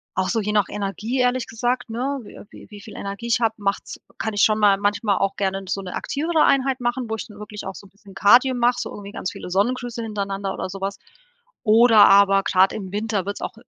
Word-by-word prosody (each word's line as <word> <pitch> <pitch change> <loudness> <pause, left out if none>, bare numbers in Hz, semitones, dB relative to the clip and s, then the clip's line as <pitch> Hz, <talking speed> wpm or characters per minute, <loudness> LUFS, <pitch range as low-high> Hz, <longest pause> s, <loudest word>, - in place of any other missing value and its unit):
auch 185 0 0
so 225 - 0
je 210 +1 -2
nach 210 -2 +2
Energie 210 +5 -3
ehrlich 250 0 +1
gesagt, 245 +2 -2
ne, 265 +5 -2
wi - - -13
wi - - -14
wie 205 -1 -11
viel 215 - -12
Energie 200 +4 -6
ich 235 - +2
habe, 225 -1 +2
macht's 200 -1 -3 0.2
kann 220 - -3
ich 205 - 0
schon 215 -1 +4
mal 205 -2 +4
manchmal 205 0 0
auch 195 0 0
gerne 195 -1 -2
so 195 - -2
'ne 180 -1 -7
aktivere 315 +2 0
Einheit 270 -1 +2
machen, 240 +1 -1
wo 220 - -1
ich 225 - -7
dann 210 -2 -14
wirklich 210 0 -8
auch 190 - -6
so - - -12
'n 190 - -19
bisschen 200 -1 -18
Kardio 245 +7 +5
mache, 245 0 +2
so - - -5
irgendwie 200 -1 -9
ganz 185 - -4
viele - - -9
Sonnengrüße 240 +4 -1
hintereinander 200 -3 -3
oder - - -4
sowas 195 +1 -5 0.7
oder 225 -1 +6
aber 195 0 +5
grad 190 0 +3
im 190 -3 -6
Winter 210 -2 -2
wird's 200 +1 -5
auch - - -4
210 Hz, 235 wpm, -22 LUFS, 195-240 Hz, 0.7 s, oder